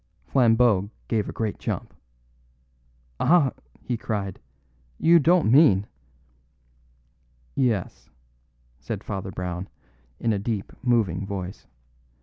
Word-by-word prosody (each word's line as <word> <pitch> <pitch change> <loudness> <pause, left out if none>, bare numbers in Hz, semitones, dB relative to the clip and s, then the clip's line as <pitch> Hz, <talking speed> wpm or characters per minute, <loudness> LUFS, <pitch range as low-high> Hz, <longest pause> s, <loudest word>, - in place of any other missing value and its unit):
Flambeau 115 - +3 0.2
gave 110 -3 0
a - - -3
great 110 -2 -3
jump. - - -4 1.3
"Ah," 160 -6 +4 0.3
he 125 - -2
cried, 100 -4 -4 0.6
"you 170 +1 +5
don't 165 -5 +3
mean 115 - +6 0.9
" - - -38 0.2
"Yes," 100 -5 -5 0.7
said - - -5
Father 95 0 -4
Brown 90 0 -5 0.5
in 115 - +1
a 100 - -1
deep, 105 -1 -3
moving 110 -8 +1
voice. 95 -2 -6
100 Hz, 105 wpm, -25 LUFS, 90-120 Hz, 1.3 s, mean